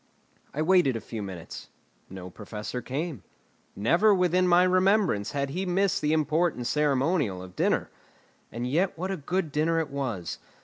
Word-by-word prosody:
I 155 - -1
waited 175 -7 +4
a - - -2
few 110 -1 -7
minutes. 95 -4 -8 0.4
No 90 -1 -8
Professor 105 +5 -6
came. 145 - -4 0.5
Never 175 - +4
within 180 0 +2
my 175 0 +5
remembrance 185 - +2
had 140 -1 -1
he 180 +6 -2
missed 190 +1 +1
the 150 - +1
important 155 -3 +1
ceremonial 140 - +1
of 90 -1 -12
dinner. - - 0 0.6
And 120 +2 -4
yet 165 +10 0
what 185 +3 -3
a 190 - -2
good 170 +2 -2
dinner 160 +3 +1
it 155 -3 -3
was! 125 -11 -4
150 Hz, 160 wpm, -27 LUFS, 120-180 Hz, 0.6 s, my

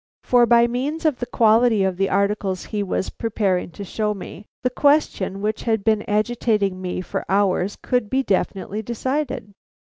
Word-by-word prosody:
For 245 -1 +4
by 235 0 +6
means 270 +7 -3
of 300 -5 +2
the 245 - -3
quality 225 -2 +4
of 190 -1 0
the 195 0 +1
articles 200 -1 0
he 210 - 0
was 190 -1 -2
preparing 200 -6 -1
to 200 - -7
show 210 +2 -2
me, 200 +1 -10 0.2
the 250 - +1
question 250 -9 +1
which 215 +1 -1
had 220 -3 0
been 220 -1 +2
agitating 210 -3 0
me 180 0 -3
for - - -4
hours 195 0 +1
could 245 -4 0
be 265 +1 +1
definitely 195 0 -1
decided. 250 0 -3
215 Hz, 170 wpm, -22 LUFS, 195-240 Hz, 0.2 s, by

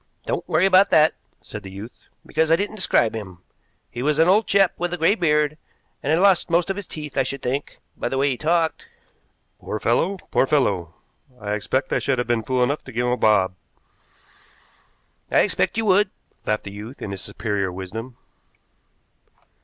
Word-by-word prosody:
"Don't - - -3
worry 165 +4 +3
about 195 +1 +5
that," 155 0 +5 0.3
said 105 - -8
the 95 - -9
youth, 100 +5 -11 0.2
"because 160 +1 0
I 165 - +6
didn't 205 +4 -2
describe 120 - +2
him. 95 -5 -8 0.5
He 120 - -5
was 150 +2 +1
an 165 +1 +5
old 205 +4 +4
chap 195 -2 +4
with 175 0 -1
a - - -9
gray 165 +4 +4
beard, 150 -5 +1 0.4
and 140 - -3
had 160 - +4
lost 195 -2 +4
most 170 +3 +2
of - - -3
his 205 -1 -6
teeth, 150 -3 -5
I - - +5
should 135 +1 -4
think, 135 +3 -3 0.2
by - - -3
the 135 - -2
way 140 +1 +2
he - - -1
talked." 165 +3 0 0.7
"Poor 110 - -4
fellow. 170 - +1
Poor 135 - +3
fellow! 100 - +1 0.4
I 105 -1 -4
expect 120 +6 -1
I - - +2
should 135 -1 0
have 125 - 0
been 120 -2 +1
fool 125 +2 0
enough 140 +4 -1
to 125 - -9
give 120 +1 -1
him 125 - +1
a - - +2
bob." 105 -6 +3 1.8
"I - - +4
expect 95 - 0
you 225 - 0
would," 200 0 +4 0.4
laughed 105 0 0
the 100 - -7
youth, 105 +6 -9
in 100 - -5
his 95 -1 -6
superior 100 -4 -2
wisdom. 110 +7 -7
135 Hz, 195 wpm, -22 LUFS, 110-165 Hz, 1.8 s, I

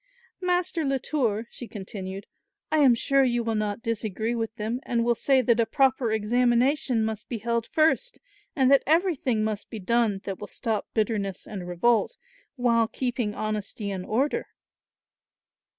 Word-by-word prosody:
"Master 360 -2 0
Latour," 265 -5 0
she 245 - -9
continued, 195 -2 -7 0.5
"I 310 - +3
am 265 -5 +6
sure 275 +3 +3
you 240 -2 +1
will 225 0 -1
not 215 +1 -2
disagree 225 0 -2
with 225 -1 -3
them 225 +2 -3
and 235 -3 0
will 240 - +4
say 260 +2 +2
that 235 0 +3
a 230 - +3
proper 260 -3 +2
examination 240 +2 +2
must 220 -1 -5
be 235 - -2
held 235 +1 -1
first, 320 +11 +1 0.4
and 265 -2 +3
that 275 - +6
everything 305 - +2
must 215 -1 -3
be 225 - -6
done 220 0 +1
that 195 -2 -5
will 205 - -7
stop 220 -1 -3
bitterness 210 -3 -1
and 190 -4 -7
revolt 225 - +1 0.4
while 235 -3 +2
keeping 240 -4 -2
honesty 215 -1 -3
and 190 -2 -4
order." 265 +7 0
230 Hz, 155 wpm, -26 LUFS, 215-260 Hz, 0.5 s, am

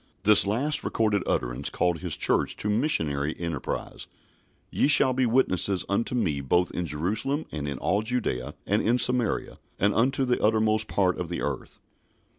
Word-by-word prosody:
This 105 -1 +6
last 140 +9 -1
recorded 105 -3 0
utterance - - -1
called 90 -2 0
His - - -4
Church - - +1
to 105 - -2
missionary 80 - 0
enterprise: 85 -5 -5 0.6
"Ye - - +2
shall 130 -3 +4
be 130 -1 +1
witnesses 100 -6 +1
unto 115 +5 -1
me 80 -12 0
both 90 +7 +1
in 90 -1 -3
Jerusalem, 105 - -2
and 75 -2 -4
in 70 - -4
all 100 +9 0
Judaea, 110 - -2
and 105 +2 +1
in 120 +2 +2
Samaria, 125 -2 0 0.2
and 100 +1 +2
unto 130 +3 +1
the 125 -1 0
uttermost 110 0 +2
part 95 -2 +1
of 90 -2 -4
the 85 - -4
earth." 70 -2 -5
105 Hz, 165 wpm, -26 LUFS, 85-120 Hz, 0.6 s, This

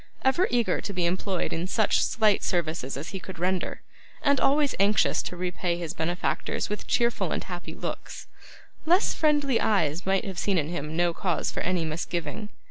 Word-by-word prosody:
Ever 305 +8 +3
eager 240 -2 +1
to 200 - -4
be 180 -2 0
employed 185 +1 -1
in 170 +3 -2
such 215 +2 +2
slight 215 -2 +2
services 160 -6 -1
as 145 - -5
he 195 - -5
could 185 -1 -9
render, 185 +2 -1 0.4
and 280 -2 +4
always 285 +1 +3
anxious 200 +1 +3
to 180 - -6
repay 180 -1 -1
his 170 -3 -4
benefactors 175 +3 -1
with 210 - -4
cheerful 235 0 +1
and - - -1
happy - - -7
looks, - - -6 0.6
less 360 +5 +4
friendly 290 -5 +2
eyes 170 -5 +2
might 195 0 +2
have 190 -3 -4
seen 200 -2 +1
in 155 -2 0
him 155 -2 -4
no 175 -1 +2
cause 180 0 -1
for - - -4
any 180 -2 0
misgiving. 170 +4 -3
185 Hz, 180 wpm, -27 LUFS, 170-220 Hz, 0.6 s, and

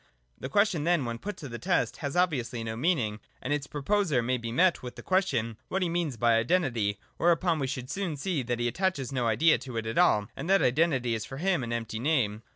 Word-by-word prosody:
The 130 - -5
question 190 -2 +2
then 170 -4 +2
when 115 -1 -4
put 205 - -6
to 145 - -7
the 120 -2 -7
test 180 0 0
has 140 -3 -4
obviously 135 -10 0
no 110 0 -4
meaning, 120 -7 0 0.2
and 135 - -2
its 145 -1 -2
proposer 150 - 0
may 125 +1 0
be 115 0 -5
met 175 +7 +3
with 125 -1 -8
the - - -10
question 130 - 0
what 190 0 -1
he 175 - 0
means 165 -7 -1
by 115 0 +3
Identity; 115 - 0 0.2
whereupon 170 -1 +2
we 135 - -1
should 130 -1 -4
soon 180 -4 -3
see 165 0 -1
that 120 -1 -2
he 120 0 0
attaches 140 -1 -1
no 125 -3 0
idea 155 +9 +4
to 125 -4 -7
it 115 - -2
at 115 +1 -1
all, 105 -1 +4
and 165 - -5
that 195 -4 +4
Identity 130 -3 +2
is 110 -2 -2
for 135 - -8
him 180 -3 +1
an 120 - -4
empty 115 -1 -3
name. 120 -7 0
135 Hz, 235 wpm, -28 LUFS, 115-170 Hz, 0.2 s, idea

